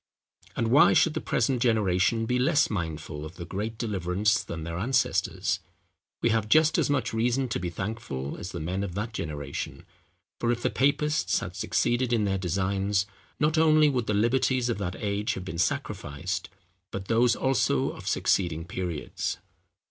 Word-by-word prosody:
And 115 -1 0
why 140 +5 +6
should 165 - +4
the - - -3
present 125 +1 0
generation 110 -1 +2
be 125 +2 0
less 145 +2 +3
mindful 80 -5 -4
of 80 +3 -8
the 85 - -7
great 105 +5 -4
deliverance 105 -1 0
than 85 -1 -6
their 85 +2 -4
ancestors? 125 +7 +1 0.6
We 115 - +4
have 110 -1 +1
just 155 +5 +5
as - - +1
much 130 -5 0
reason 120 +4 +1
to - - -1
be 90 -1 -3
thankful 85 -8 -4
as 90 - -6
the 85 - -5
men 90 +5 -2
of 90 -3 -5
that 110 +3 -3
generation; 75 -7 -5 0.5
for 120 - +1
if 120 0 -2
the - - +1
papists 145 +3 +1
had - - -6
succeeded 120 +1 0
in 115 -3 +2
their 95 -1 0
designs, 95 +2 0 0.3
not 155 +2 +2
only 155 -1 +5
would 125 -5 -1
the 105 - +1
liberties 125 +3 +2
of 115 - -1
that 90 -2 -3
age 105 0 -1
have 95 - -6
been 85 -2 -5
sacrificed, 85 +1 -2 0.4
but 95 0 -6
those 115 +1 +3
also 135 -1 +1
of - - -10
succeeding 80 -4 +1
periods. 85 -3 -3
105 Hz, 170 wpm, -27 LUFS, 90-120 Hz, 0.6 s, why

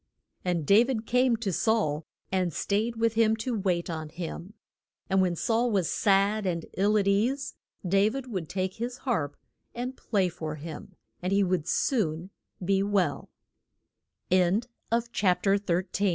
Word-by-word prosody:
And 175 -4 0
Da 205 +9 +6
vid 240 -3 -2
came 250 0 +3
to 210 -5 -2
Saul, 165 -9 +1 0.2
and 185 -2 +1
stayed 215 +8 -1
with 225 0 +1
him 220 -1 +3
to 230 +2 -3
wait 185 -4 0
on 160 -2 -4
him. 170 +4 -7 0.6
And 190 0 +4
when 180 -2 +1
Saul 230 +7 +1
was 195 -7 +1
sad 200 0 +2
and 170 -2 -2
ill 205 +3 +3
at 200 -1 +1
ease, 250 +7 +1 0.3
Da 195 +3 +4
vid 265 +3 -5
would 185 -10 -4
take 185 0 -2
his 240 +2 -4
harp 150 - -1 0.4
and 250 +2 -4
play 200 -7 0
for 160 -3 -5
him, 155 +1 -9 0.3
and 180 +1 -2
he 200 0 +4
would 180 -4 0
soon 180 - 0
200 Hz, 135 wpm, -28 LUFS, 175-230 Hz, 0.6 s, Da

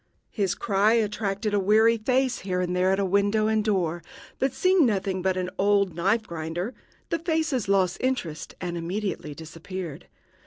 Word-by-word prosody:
His 195 -5 0
cry 205 +1 +2
attracted 210 -1 -1
a 205 - +3
weary 220 +4 +4
face 255 +2 +1
here 185 -1 -2
and 180 0 -1
there 185 +1 +3
at 195 0 +1
window 200 +3 +2
and 220 0 +2
door; 175 -5 0 0.4
but, 265 0 +1
seeing 370 +5 +3
nothing 195 -5 0
but 185 0 0
an 180 0 -2
old 200 -1 +3
knife 200 +6 +1
grinder, 170 +6 -4 0.4
the 335 - 0
faces 315 - 0
lost 190 -2 +2
interest 215 -12 -3
and 175 -1 -4
immediately 180 -3 -3
disappeared. 165 0 -7
200 Hz, 160 wpm, -26 LUFS, 180-220 Hz, 0.4 s, weary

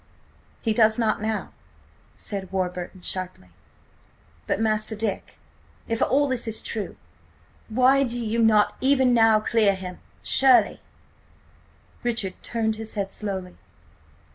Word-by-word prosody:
"He 225 - 0
does 220 -1 +4
not 220 -3 0
now!" 220 -1 -3 0.6
said 195 -3 -5
Warburton 180 0 -4
sharply. 185 - -5 1.0
"But, - - 0
Master 215 0 0
Dick, 215 -2 -4 0.5
if 230 0 -2
all 285 +3 +3
this 255 -3 -2
is 220 0 +1
true, 215 -3 -5 0.7
why 255 +4 +4
do 240 -2 -1
you 225 +2 -1
not 220 -2 +4
even 260 -2 +3
now 225 -2 +5
clear 215 -2 +2
him? 185 -1 -8 0.2
Surely—" 265 -2 +4 1.2
Richard 230 -6 -1
turned 220 -2 -2
his 220 0 -7
head 195 -2 -3
slowly. 190 -4 -5
220 Hz, 120 wpm, -24 LUFS, 195-235 Hz, 1.2 s, now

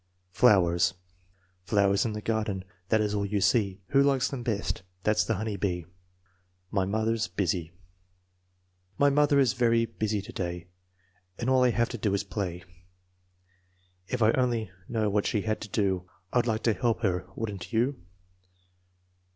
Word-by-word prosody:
Flowers 90 -5 +4 0.7
Flowers 100 +2 +2
in 110 - -1
the 105 0 -6
garden. 105 -4 -1 0.2
That 110 -1 +3
is 105 -1 0
all 100 -1 0
you 100 0 -1
see 100 -1 +1
Who 140 - +4
likes 135 -2 +2
them 135 -3 -5
best? 110 -4 -2 0.2
That's 105 0 +3
the 115 - -1
honey 105 +1 -3
bee. 90 -3 -2 0.4
' 90 0 -41
My 95 -2 +1
mother 110 +3 0
9 - - +1
s 110 - -1
busy 90 -3 -2 1.3
My 145 0 +4
mother 145 0 +4
is 135 -4 +4
very 115 -2 +3
busy 110 -2 -2
today 90 -3 -5 0.7
And 125 +2 -1
all 130 -1 +4
I 125 - +5
have 120 0 +1
to 120 - -6
do 100 -1 +1
is 100 - -1
play. 95 -4 -4 1.4
If 125 +1 0
I 110 - +6
only 120 -6 0 0.2
knew 110 -2 0
what 105 0 +1
she 105 - 0
had 110 0 -2
to 105 - -7
do 95 -3 0 0.2
I'd 120 -1 +2
like 110 -1 -1
to 115 - +3
help 115 0 0
her, 90 -3 0
would 110 -2 -3
n't 95 +2 -8
you? 120 -1 0
105 Hz, 170 wpm, -28 LUFS, 95-115 Hz, 1.4 s, I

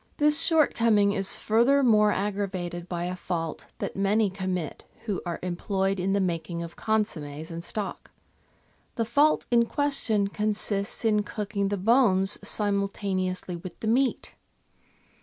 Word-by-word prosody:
This 300 +1 +4
shortcoming 230 -11 +3
is 195 -2 +6
furthermore 230 -2 +3
aggravated 190 -4 -3
by 175 -1 -3
a 180 +1 -3
fault 165 -3 -4
that - - -5
many 200 +1 +1
commit 185 -4 -4 0.2
who 205 -5 -2
are 170 - -3
employed 190 +2 -1
in 190 +2 0
the 200 - +2
making 170 -2 -2
of 170 0 -9
consommes 160 -8 -2
and 165 0 -6
stock. 210 +2 -5 0.9
The 230 - -1
fault 290 +7 +2
in 235 -1 +4
question 275 -9 0
consists 210 0 0
in 210 -1 +3
cooking 205 -1 -3
the 200 +1 -2
bones 195 -2 +3
simultaneously 200 -3 -1
with 170 0 -9
the - - -6
meat. 255 +3 0
200 Hz, 135 wpm, -26 LUFS, 185-220 Hz, 0.9 s, is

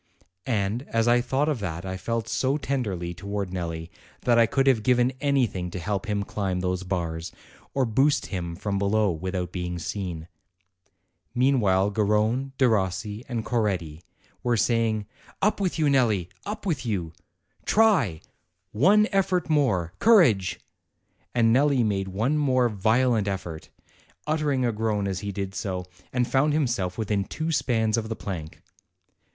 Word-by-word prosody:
And 110 -1 0
as 115 0 +1
I 120 0 +5
thought 135 +4 0
of 150 -6 0
that 90 -3 -4
I 95 0 -3
felt 115 +4 -3
so 135 +2 0
tenderly 105 - -2
towards 100 +1 -4
Nelli 85 -2 -4 0.3
that 120 -1 +3
I 115 - +5
could 135 +3 +1
have 130 -5 +4
given 125 +2 +3
anything 125 -11 +1
to 90 - -6
help 100 +3 -3
him 105 -1 0
climb 95 -3 -2
those 90 0 -1
bars, 85 -3 -3 0.4
or 135 -2 +2
boost 135 +4 +2
him 85 -3 -4
from 100 +2 -2
below 100 0 +2
without 90 +1 -3
being 90 -1 -4
seen. 85 -2 -5 1.1
Meanwhile 105 -7 +3
Garrone, 110 +5 +1
Derossi, 105 -3 0
and 115 -3 -3
Coretti 90 -10 -1 0.4
were 120 -1 +1
say 115 +1 +2
ing: 110 -1 -2 0.3
"Up 210 +1 +1
with 185 -3 0
you, 155 - +2
Nelli, 115 -10 +2 0.2
up 210 0 -5
with 165 -9 -1
you!" 95 -9 -2 0.5
Try 185 - +3 0.5
one 200 - +4
effort 185 -4 +1
more 95 - +1
courage!" 120 - +4 0.8
And 115 -1 +4
Nelli 135 -1 +3
made 100 -2 -1
one 115 +11 0
more 130 -4 +3
violent 110 +1 +2
effort, 90 -5 -5 0.6
utering 150 -4 0
a - - +1
groan 105 -2 -1
as 95 -2 -2
he 100 -1 -4
did 100 -1 -4
so, 95 -2 -3 0.3
and 125 -1 +1
found 135 +4 +2
himself 120 - 0
within 105 -3 0
two 160 +10 -3
spans 110 -7 +1
of 110 -1 -5
the 110 - -2
plank. 85 -8 -7
110 Hz, 155 wpm, -26 LUFS, 95-130 Hz, 1.1 s, I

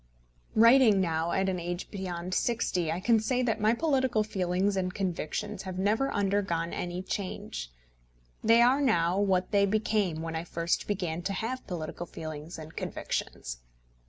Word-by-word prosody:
Writing 230 -2 +7
now 165 -2 0
at 190 0 +1
an 185 -1 -1
age 175 +1 -4
beyond 185 -2 -4
sixty, 185 -8 0
I 165 - -2
can 225 +4 +3
say 250 +4 0
that 225 -4 0
my 215 +2 +4
political 260 -6 +2
feelings 190 -1 0
and 185 -1 -1
convictions 195 +2 -3
have 185 -2 -6
never 215 +8 +1
undergone 195 -5 0
any 180 +1 -3
change. 185 - -4 0.7
They 230 +1 +6
are 260 +4 +4
now 180 -8 +2
what 190 -2 +1
they 200 -1 +4
became 205 -5 0
when 165 0 -4
I 160 - -2
first 170 0 -1
began 180 -5 -2
to 195 +3 -2
have 245 +6 -4
political 175 -1 -5
feelings 155 +1 -7
and 155 0 -10
convictions. - - -4
190 Hz, 160 wpm, -29 LUFS, 170-215 Hz, 0.7 s, Writing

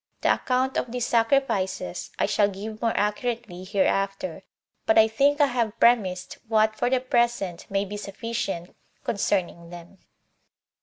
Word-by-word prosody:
The - - +4
account 260 +1 0
of 240 - -2
these 245 -1 -1
sacrifices 225 - 0
I - - +2
shall 205 - +3
give 210 +2 -7
more 230 -1 0
accurately 210 -2 -2
hereafter; 195 -2 -1 0.5
but 220 - +4
I 220 0 +7
think 280 +6 +2
I 290 - +6
have 235 -4 -1
premised 190 -7 +2
what 220 -1 +3
for 245 - 0
the 260 0 +2
present 240 -8 0
may 195 0 0
be 205 +1 -6
sufficient 200 -3 -4 0.3
concerning 175 -5 -1
them. 175 +2 -12
215 Hz, 145 wpm, -25 LUFS, 190-240 Hz, 0.5 s, I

